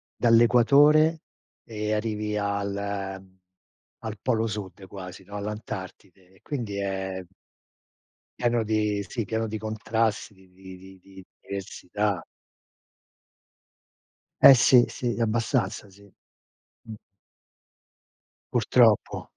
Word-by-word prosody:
dall'equatore 140 +7 +5 0.4
e 105 -1 -3
arrivi 105 -1 -2
al, 100 -1 -2 0.5
uhm, 95 0 -21 0.6
al 110 -2 -6
polo 115 -3 0
sud 100 -2 -7
quasi, 95 0 -10
no, 100 +2 -11
all'Antartide. 100 -3 -8
E 95 - -25
quindi 115 -9 -5
è 95 -1 -3 1.2
pieno 120 -1 +1
di 105 -2 -1
sì, 115 +1 -4
pieno 110 +2 -2
di 110 - -4
contrasti, 110 0 -2
di 95 -1 -22
di 95 0 -12
di 95 +1 -15
di 95 -1 -14 0.2
diversità. 100 0 -3 2.2
Eh, - - +11
sì, 125 0 +6
sì, 120 -2 -3
abbastanza 115 -2 -1
sì. 100 +1 -19 0.7
Mh. 110 - -9 1.6
Purtroppo. 115 -2 +2
105 Hz, 100 wpm, -26 LUFS, 95-115 Hz, 2.2 s, Eh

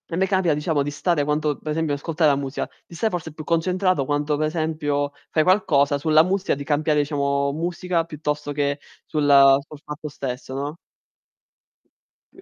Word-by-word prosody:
me 190 - +2
capita 185 -5 +2
diciamo 150 -1 0
di 145 - -1
stare 150 +1 0
quanto 150 0 0
per 155 - -7
esempio 160 -2 0
ascoltare 155 +1 +1
la - - +2
musica, 140 0 -3 0.2
di 170 - -12
stare 220 +6 0
forse 165 -3 -4
più 155 0 -9
concentrato 180 0 +1
quanto 145 +2 0
per 155 +1 0
esempio 155 -3 -1 0.2
fai 155 - +2
qualcosa 145 -7 +3
sulla 155 +1 +5
musica, 190 -1 0
di 140 - -6
cambiare 150 +1 +1
diciamo 140 -1 0
musica 170 +1 -1
piuttosto 150 -2 -3
che 140 0 -1 0.3
sulla 140 -3 +5
sul 150 - -11
fatto 150 +1 -6
stesso, 130 -1 -6
no? 145 +4 -4 1.6
Qui 375 - -16
150 Hz, 170 wpm, -23 LUFS, 145-165 Hz, 1.6 s, sulla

